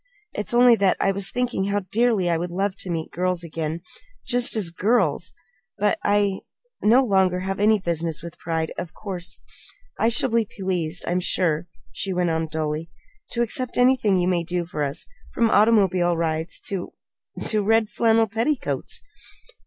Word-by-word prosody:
It's 210 - -3
only 245 0 +7
that 195 -2 +2
I 195 - +2
was 195 0 -2
thinking 245 -6 -1
how 200 +1 0
dearly 225 -5 +2
I 170 - +2
would 175 +2 -2
love 190 +2 -1
to 185 - -5
meet 165 -2 -3
girls 180 0 -1
again 165 0 -4 0.4
just 245 -1 +3
as 195 -6 +2
girls! 185 -4 +1 0.5
But 210 0 +1
I 205 -1 +2 0.4
no 240 +5 +5
longer 190 -5 +2
have 195 +1 -3
any 215 +1 +4
business 165 -4 -2
with 170 -1 -9
pride, 160 -1 -2
of 175 - -7
course. 185 -4 -6 0.6
I 225 - +3
shall 240 +2 +1
be 230 -1 +2
pleased, 180 -3 -2
I'm 175 +1 +1
sure," 170 -2 0 0.2
she 195 - -3
went 175 -2 +1
on 160 0 -1
dully, 155 +1 -3 0.4
"to 235 - +1
accept 250 +2 -4
anything 245 -6 +4
you 180 0 +1
may 175 -2 +1
do 175 0 -2
for 155 -3 -5
us, 140 -1 -1 0.3
from 230 -1 +2
automobile 190 -5 +4
rides 160 0 -2
to 195 -3 -4 0.5
to 215 -1 +3
red 220 +2 +3
flannel 225 -1 +3
petticoats." 230 +7 -1
190 Hz, 170 wpm, -23 LUFS, 170-220 Hz, 0.6 s, only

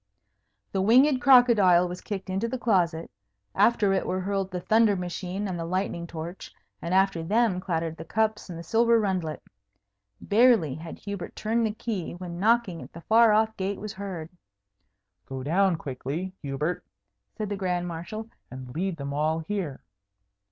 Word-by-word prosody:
The 190 - 0
winged 255 +6 +5
crocodile 225 -10 +6
was 180 +1 -7
kicked 200 -3 -5
into 190 +4 -1
the 260 +3 -3
closet, 175 -9 0 0.4
after 210 -4 +3
it 190 - 0
were 185 - -1
hurled 195 0 -2
the 180 -1 -4
thunder 220 +2 +3
machine 180 +2 -4
and 180 -3 -4
the - - -2
lightning 170 -1 -2
torch, 170 +3 -7 0.3
and 170 - -4
after 190 -2 +2
them 205 +2 +1
clattered 165 -3 -2
the - - -7
cups 215 +4 -1
and 170 - -6
the 170 - -7
silver 230 +3 +3
rundlet. 185 -8 -2 0.8
Barely 215 - +4
had 160 +3 -8
Hubert 200 -2 -7
turned 225 +1 0
the - - -2
key, 215 -7 -4
when 175 -1 -7
knocking 215 -4 +2
at - - -12
the 170 - -10
far 225 +4 +5
off 220 +1 +2
gate 195 +1 -2
was 210 0 -6
heard. 190 -5 -6 1.0
"Go 130 -1 -6
down 185 +5 +2
quickly, 155 +5 -5
Hubert," 150 +5 -3 0.5
said 215 -2 -3
the 205 - -2
Grand 180 -2 -1
Marshal, 175 +7 -6 0.2
"and 130 -1 -9
lead 180 +1 -2
them 140 -1 -5
all 155 +2 +1
here." 165 -5 -4
190 Hz, 165 wpm, -26 LUFS, 170-215 Hz, 1.0 s, crocodile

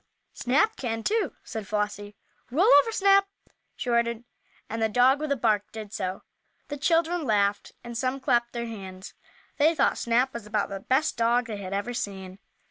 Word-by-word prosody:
"Snap 430 - +1
can, 225 -3 -3
too," 440 - 0
said 220 -3 -6
Flossie. 205 -1 -3 0.3
"Roll 310 +10 +2 0.2
over, 455 - -5
Snap!" 395 -1 +4 0.5
she - - -6
ordered, 235 -1 +1 0.4
and 225 +1 -4
the 220 - +2
dog, 250 +5 +4
with 305 -1 -3
a - - +3
bark, 215 -5 0
did 215 -2 -8
so. 185 -1 -4 0.5
The 290 - -4
children 335 +3 +1
laughed 205 -4 0
and 235 0 -8
some 255 +2 -1
clapped 240 -2 +1
their 235 -1 -3
hands. 190 -4 -8 0.4
They 315 +3 +4
thought - - +2
Snap 245 +3 +1
was 235 -3 -7
about 210 -1 -1
the 195 - -5
best 265 +9 0
dog 235 +1 +2
they 220 -3 -5
had 190 -2 -7
ever 205 +5 -2
seen. 190 -4 -5
235 Hz, 180 wpm, -26 LUFS, 210-270 Hz, 0.5 s, Snap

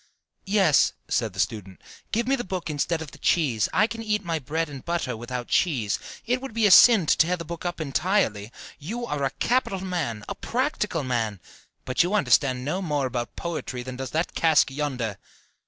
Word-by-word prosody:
"Yes," 195 -7 +4
said 115 -4 0
the 95 - -9
student, 100 -2 -2 0.3
"give 235 +2 0
me 270 - +3
the 240 - -4
book 180 -5 -4
instead 160 +2 -1
of 150 - -11
the - - -14
cheese: 130 - +2
I 215 - +4
can 230 0 -6
eat 210 -3 -1
my 165 -2 -1
bread 160 +4 -2
and 140 -3 -9
butter 170 -8 -2
without 120 +2 -5
cheese. 125 - +1 0.3
It 250 +2 0
would 270 -5 -8
be 225 -2 +3
a 205 - +5
sin 215 -1 +8
to - - +4
tear 175 +3 +2
the 170 - -7
book 170 +2 -7
up 175 -1 -3
entirely. 140 - 0 0.3
You 225 +11 -4
are 150 -9 -3
a 135 - +2
capital 195 - 0
man, 160 - -3
a - - -3
practical 220 - -2
man, 115 -6 -1 0.5
but 130 - +2
you 180 +4 +1
understand 130 -10 +2
no 180 +7 -1
more 150 -6 -1
about 125 -2 -4
poetry 155 -7 -4
than 130 0 -7
does 130 -1 -4
that 160 +5 -1
cask 160 -4 +3
yonder." 130 -8 -3
155 Hz, 200 wpm, -25 LUFS, 125-190 Hz, 0.5 s, sin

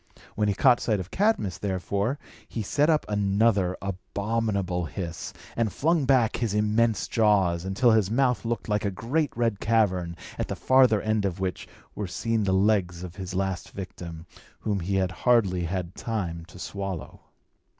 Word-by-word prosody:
When 105 0 0
he 100 - +1
caught 125 +1 +5
sight 110 -4 0
of 95 0 -7
Cadmus, 195 - +1
therefore, 100 - -1 0.3
he 115 - -3
set 145 +9 +2
up 155 -2 +3
another 100 -2 +2
abominable 100 -1 -2
hiss, 85 0 -5 0.2
and 115 -3 0
flung 160 - +1
back 125 -4 +3
his 110 -4 -1
immense 105 +1 +2
jaws, 95 -6 +2
until 110 +6 +3
his 110 -4 +3
mouth 125 +2 +2
looked 115 0 -3
like 105 -1 0
a 100 - +1
great 130 - -1
red 115 -4 +1
cavern, 95 -7 +1 0.2
at - - -1
the - - -3
farther 130 -5 +4
end 110 -1 +1
of 95 -2 -2
which 95 -1 -3 0.3
were 105 - -4
seen 115 +3 -1
the 95 - +1
legs 95 -3 +2
of 90 -1 -8
his 95 -1 -5
last 95 -1 -2
victim, 85 -4 -7 0.4
whom 105 -2 -1
he 95 +3 -2
had 95 -1 +1
hardly 95 -6 +2
had 90 0 -3
time 85 -8 -4
to 90 - -14
swallow. 95 -4 -5
100 Hz, 170 wpm, -26 LUFS, 95-115 Hz, 0.4 s, caught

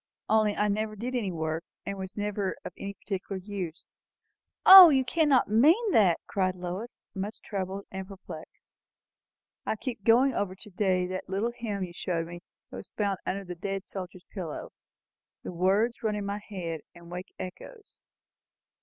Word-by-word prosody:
Only 215 -1 +3
I 210 - +1
never 215 +1 -1
did 240 +5 -4
any 220 -7 -1
work, 160 -1 -2 0.2
and 200 - -3
was 190 +2 -7
never 205 -2 -1
of - - -6
any 200 0 -6
particular 195 0 -4
use." 185 -4 -6 0.8
"O, 375 -2 +13
you 265 -3 +3
cannot 290 -1 +3
mean 320 - +4
that!" 190 - +4
cried 185 -2 0
Lois, 180 +6 -6
much 200 +2 -5
troubled 195 -1 -4
and 190 -1 -5
perplexed. 195 -1 -11 0.9
"I - - -1
keep 225 -2 -6
going 245 +5 +5
over 200 -4 -2
to 210 +3 -12
day 185 -1 +1
that 185 +1 -5
little 200 +5 0
hymn 210 -5 -3
you 175 -1 -6
showed 170 -1 -2
me, 175 +1 -8 0.3
that - - -7
was - - -9
found 200 -3 0
under 200 +1 -2
the 180 -2 -6
dead 195 +2 -4
soldier's 185 -1 -8
pillow. 175 -7 -5 0.7
The - - -5
words 200 +8 +2
run 215 -2 0
in 205 -1 -3
my 200 +1 -3
head, 170 -6 -4
and 170 0 -13
wake 180 +2 -7
echoes. 420 - -10
200 Hz, 170 wpm, -28 LUFS, 185-220 Hz, 0.9 s, O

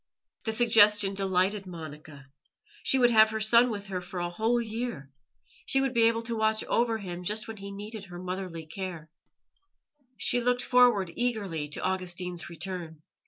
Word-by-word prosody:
The 220 - 0
suggestion 210 -3 +5
delighted 195 +1 0
Monica. 155 -4 -10 0.6
She 265 - +3
would 245 -2 +4
have 220 -1 +6
her 220 0 -3
son 235 +3 +5
with 205 -3 -5
her 190 -2 -4
for 180 +1 -7
a 175 0 -2
whole 225 +6 +1
year. 225 - -5 0.6
She 270 - +2
would 270 -1 0
be 230 -2 +5
able 230 0 0
to 230 0 -3
watch 220 0 +1
over 230 -1 +1
him 180 -4 -7
just 215 +4 -1
when 225 -1 -7
he 200 0 -8
needed 205 +1 -7
her 175 -1 -10
motherly 180 -2 -5
care; 165 -2 -7 1.1
she 245 - +2
looked 245 +1 +2
forward 240 -8 +4
eagerly 200 -11 -1
to 150 - -5
Augustine's 180 -2 -3
return. 170 -3 -7
200 Hz, 165 wpm, -28 LUFS, 180-225 Hz, 1.1 s, have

